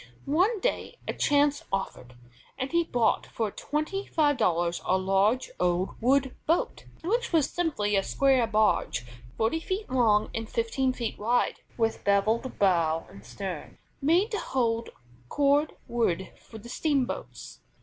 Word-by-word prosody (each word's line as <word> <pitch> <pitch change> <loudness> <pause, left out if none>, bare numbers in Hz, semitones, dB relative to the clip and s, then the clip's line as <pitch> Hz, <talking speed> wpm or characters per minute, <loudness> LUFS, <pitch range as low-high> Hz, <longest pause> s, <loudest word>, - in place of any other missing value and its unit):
One 370 +10 +2
day - - -2
a - - -1
chance 290 0 +2
offered, 160 -10 -4 0.4
and 260 +1 -3
he 340 0 +3
bought 240 -8 +1
for 220 -3 -2
twenty 310 - -3
five 295 -2 +2
dollars 170 0 +1
a 185 - +2
large 195 +6 +1
old 180 +1 +1
wood 265 +2 +2
boat, 330 +3 0 0.2
which 465 +8 0
was 320 -5 +2
simply 275 -13 0
a 195 - +4
square 260 +2 +2
barge 210 - +1 0.3
forty 225 +9 +1
feet 375 +1 -4
long 220 -5 +3
and 225 -1 -4
fifteen 255 +3 0
feet 235 -3 -4
wide, 235 +4 +1 0.2
with 225 -1 0
bevelled 215 +5 +1
bow 165 -4 +2
and 100 +1 -13
stern, 150 - -7 0.2
made 340 +9 +3
to 425 - -1
hold 230 -3 -1 0.4
cord 290 +1 +2
wood 190 -6 0
for 220 - -13
the 220 +2 -11
steamboats. 275 0 -2
235 Hz, 145 wpm, -27 LUFS, 200-290 Hz, 0.4 s, a